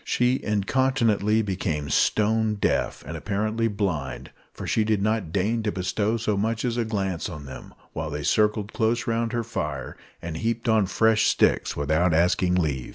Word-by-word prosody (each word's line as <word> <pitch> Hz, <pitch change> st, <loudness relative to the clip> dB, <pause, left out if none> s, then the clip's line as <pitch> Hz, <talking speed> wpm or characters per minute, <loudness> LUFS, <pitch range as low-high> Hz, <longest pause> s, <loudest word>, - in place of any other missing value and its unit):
She 125 Hz, +2 st, +1 dB
incontinently 110 Hz, -1 st, +1 dB
became 80 Hz, -7 st, -2 dB
stone 110 Hz, 0 st, +2 dB
deaf; 100 Hz, -, -1 dB
and 80 Hz, -, -6 dB
apparently 110 Hz, +6 st, -1 dB
blind, 85 Hz, -, -3 dB, 0.2 s
for -, -, -8 dB
she 110 Hz, -, +1 dB
did 105 Hz, -1 st, +1 dB
not 105 Hz, -4 st, -1 dB
deign 105 Hz, +5 st, 0 dB
to 110 Hz, -1 st, -1 dB
bestow 100 Hz, +4 st, -1 dB
so 110 Hz, -2 st, -1 dB
much 110 Hz, +4 st, -1 dB
as 120 Hz, -2 st, -1 dB
a 120 Hz, -, +1 dB
glance 95 Hz, -6 st, -2 dB
on 75 Hz, -5 st, -8 dB
them, 65 Hz, -, -10 dB, 0.2 s
while 80 Hz, 0 st, -4 dB
they 75 Hz, 0 st, -4 dB
circled 105 Hz, +3 st, +1 dB
close 115 Hz, +1 st, 0 dB
round 115 Hz, 0 st, -1 dB
her 120 Hz, -1 st, -1 dB
fire, 75 Hz, -, -4 dB, 0.2 s
and 85 Hz, -1 st, -6 dB
heaped 115 Hz, +4 st, -2 dB
on 110 Hz, -4 st, +3 dB
fresh 110 Hz, +2 st, +3 dB
sticks -, -, +2 dB
without 80 Hz, +4 st, +2 dB
asking 90 Hz, +2 st, +2 dB
leave. 75 Hz, -8 st, -1 dB
105 Hz, 170 wpm, -25 LUFS, 85-110 Hz, 0.2 s, on